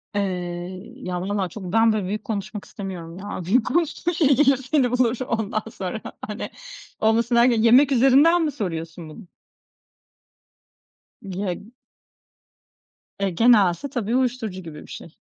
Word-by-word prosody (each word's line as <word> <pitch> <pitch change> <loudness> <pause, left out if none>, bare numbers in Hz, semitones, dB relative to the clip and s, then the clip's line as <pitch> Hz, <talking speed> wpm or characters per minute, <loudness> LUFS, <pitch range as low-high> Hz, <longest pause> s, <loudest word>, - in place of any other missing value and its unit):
Eee, 185 +2 -4
ya 180 -9 -4
valla 195 0 -2
çok 210 - -9
ben 225 0 +4
böyle 210 -3 -1
büyük 210 +2 -3
konuşmak 210 -1 -5
istemiyorum 180 -4 -7
ya. 195 -1 -6
Büyük 225 +5 +2
konuştuğun 340 +1 0
şey 305 -5 +3
gelir 275 -1 +4
seni 265 -1 +1
bulur 250 -1 +2
ondan 220 -1 -1
sonra 195 +2 -5 0.3
hani. 210 0 -5 0.5
Olmasın 230 +2 +2
derken 235 -1 +4
yemek 250 +5 +6
üzerinden 275 +7 +5
mi 300 - 0
soruyorsun 165 - -5
bunu? 180 +5 -12 1.9
Geg 195 +3 -5 1.5
E, 195 -1 +1
gene 225 +5 +5
aslında, 195 +9 0
tabii, 235 -1 -1
uyuşturucu 235 -7 -1
gibi 155 -3 -9
bir - - -14
şey 165 - -10
215 Hz, 135 wpm, -23 LUFS, 185-250 Hz, 1.9 s, yemek